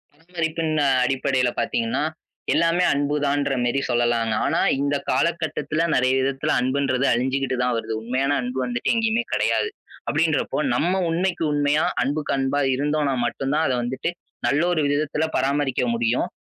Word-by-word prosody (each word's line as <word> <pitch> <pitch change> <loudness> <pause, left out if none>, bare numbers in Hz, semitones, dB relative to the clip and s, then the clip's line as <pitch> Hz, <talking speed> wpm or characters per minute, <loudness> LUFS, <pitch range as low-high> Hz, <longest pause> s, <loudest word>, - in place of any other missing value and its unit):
பராமரிப்பின் 165 -1 -3 0.3
அடிப்படையில 130 -2 +1
பார்த்தீங்கன்னா 115 +4 -1 0.5
எல்லாமே 170 +2 +2
அன்புதான்ற 145 -1 0
மாரி 120 +3 +1
சொல்லலாம். 120 -2 +1
ஆனா - - +1 0.2
இந்தக் 140 0 -1
காலகட்டத்துல 160 +1 0
நெறைய 130 0 +3
விதத்துல 135 +1 -1
அன்புன்றது 130 +1 0
அழிஞ்சுகிட்டு 130 +2 0
தான் 125 -1 +1
வருது. 110 0 -4
உண்மையான 130 +5 0
அன்பு 125 +1 -4
வந்துட்டு 120 - -1
எங்கயுமே 230 +1 +1
கிடையாது. 435 - +1 0.4
அப்படின்றப்போ 160 -1 0 0.2
நம்ம 175 +8 +1 0.2
உண்மைக்கு 175 +1 -1
உண்மையா, 145 +1 +2 0.2
அன்புக்கு 145 +4 -1
அன்பா 135 +2 0 0.2
இருந்தோம்னா 145 +1 0
மட்டும்தான் 135 +6 -1
அதை 130 - +1
வந்துட்டு 130 +6 -2 0.4
நல்ல 145 +3 +2
ஒரு 160 -3 +1
விதத்துல 150 +2 0
பராமரிக்க 140 -1 0
முடியும். 115 +1 0
140 Hz, 130 wpm, -23 LUFS, 130-155 Hz, 0.5 s, நெறைய